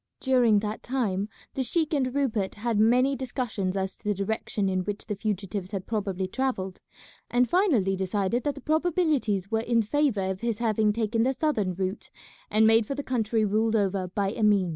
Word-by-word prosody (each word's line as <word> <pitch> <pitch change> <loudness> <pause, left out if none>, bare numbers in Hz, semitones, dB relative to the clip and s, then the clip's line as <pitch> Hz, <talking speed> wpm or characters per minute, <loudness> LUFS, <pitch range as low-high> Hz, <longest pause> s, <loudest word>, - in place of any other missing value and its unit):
During 245 -6 +3
that 210 +1 -4
time 215 -6 -1 0.2
the 270 - -2
sheik 310 +5 0
and 260 -3 0
Rupert 230 -9 0
had 225 0 -1
many 250 +5 +4
discussions 235 -7 -3
as 190 0 -2
to - - -30
the 205 -1 0
direction 200 0 -2
in 185 -1 0
which 205 +2 -4
the 215 - -3
fugitives 200 -2 -3
had 195 -3 -4
probably 195 -4 -2
travelled, 190 -5 -2 0.5
and 245 0 +3
finally 270 - +2
decided 195 +4 0
that 290 -1 -1
the - - -9
probabilities 310 - +1
were 220 - +2
in 230 0 +1
favour 215 -6 +1
of 190 +1 -6
his 230 -2 -1
having 215 -2 +2
taken 225 +1 0
the 260 +3 +2
southern 235 - 0
route 190 +3 -3 0.4
and 215 +1 +4
made 225 0 +5
for 275 - -3
the 285 - -4
country 225 -4 0
ruled 220 +2 +1
over 195 -3 +1
by 195 +2 -1
Emin. 205 -4 +2
220 Hz, 185 wpm, -27 LUFS, 195-250 Hz, 0.5 s, made